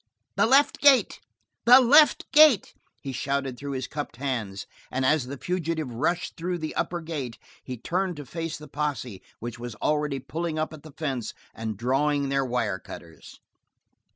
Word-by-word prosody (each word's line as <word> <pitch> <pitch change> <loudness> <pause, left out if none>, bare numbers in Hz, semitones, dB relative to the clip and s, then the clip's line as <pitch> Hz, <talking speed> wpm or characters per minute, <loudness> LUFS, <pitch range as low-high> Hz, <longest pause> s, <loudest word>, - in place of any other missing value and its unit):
"The - - +3
left 275 +4 +4
gate! 280 -3 +5 0.5
The 250 +2 +9
left 290 +5 +6
gate!" 295 -7 +6 0.3
he 135 - -4
shouted 135 0 -2
through 140 +2 -6
his 130 -1 -3
cupped 145 -3 -6
hands, 115 -7 -3 0.2
and 130 +1 -1
as 145 -2 +2
the 140 +2 -6
fugitive 165 -5 -3
rushed 165 +8 -1
through 175 +2 -3
the 155 -2 -5
upper 175 0 -2
gate 145 -8 -5 0.3
he 130 -1 -6
turned 180 +8 -2
to 145 -1 -8
face 165 +3 -5
the 150 - -11
posse 140 -9 -4 0.2
which 120 +1 -7
was 120 -2 -6
already 150 0 0
pulling 155 +5 -4
up 155 0 -2
at 155 - -10
the 155 -1 -13
fence 135 -7 -3 0.2
and 110 -2 -5
drawing 140 +4 +1
their 135 0 +1
wirecutters. 105 -9 -5
145 Hz, 165 wpm, -26 LUFS, 125-165 Hz, 0.5 s, The